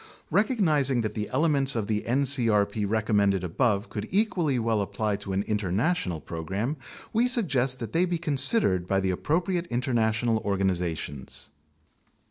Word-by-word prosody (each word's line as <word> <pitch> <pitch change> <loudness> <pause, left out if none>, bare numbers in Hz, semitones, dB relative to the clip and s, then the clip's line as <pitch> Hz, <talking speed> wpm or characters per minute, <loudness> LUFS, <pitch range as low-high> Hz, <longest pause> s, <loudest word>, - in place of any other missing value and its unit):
Recognizing 155 - +2
that 110 - -3
the 105 -2 -4
elements 140 -2 +2
of 110 -3 -1
the 105 0 -1
ncrp 115 -6 +2
recommended 100 -3 +1
above 100 +4 0
could 105 - -5
equally 180 - +1
well 115 -2 0
apply 105 +1 -2
to 100 -1 -7
an 95 +1 0
international 105 - -1
program, 95 - -4 0.4
we 235 +3 +3
suggest 135 - +1
that 115 -4 -7
they 175 +2 +3
be 175 -1 -1
considered 140 - +2
by 95 +1 +1
the 95 -1 0
appropriate 170 - -1
international 120 -3 0
organizations. 90 -9 -2
115 Hz, 135 wpm, -26 LUFS, 100-145 Hz, 0.4 s, we